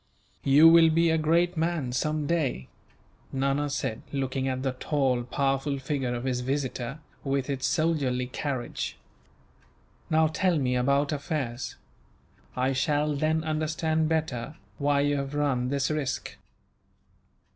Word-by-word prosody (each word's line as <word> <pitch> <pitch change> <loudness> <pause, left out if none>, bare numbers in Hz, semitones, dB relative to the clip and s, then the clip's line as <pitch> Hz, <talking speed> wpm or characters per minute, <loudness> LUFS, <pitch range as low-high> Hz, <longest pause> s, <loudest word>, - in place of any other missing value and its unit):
"You 145 +4 +7
will 165 0 +7
be 165 +1 +3
a 160 - +3
great 170 +3 +2
man, 160 -5 -1
some 150 +4 -1
day," 140 - -1 0.6
Nana 140 +2 0
said, 140 -6 -3
looking 135 -1 -1
at 130 0 -2
the 135 - +1
tall, 130 -1 0
powerful 135 +3 -1
figure 135 -2 -2
of 120 - -4
his 130 -2 -1
visitor, 130 0 -2 0.3
with 135 0 -1
its 135 -1 -1
soldierly 140 -6 +1
carriage. 130 0 -4 1.1
"Now, 160 0 +4
tell 170 +2 +1
me 125 -3 0
about 140 +4 +2
affairs. 140 -5 -3 0.8
I 130 +1 +1
shall 150 +3 +1
then 155 +2 +1
understand 155 0 0
better 155 -4 -2 0.2
why 145 0 +2
you 145 0 +1
have 140 +1 -4
run 135 -4 +1
this 140 +1 0
risk." 150 -3 -3
140 Hz, 135 wpm, -27 LUFS, 130-155 Hz, 1.1 s, You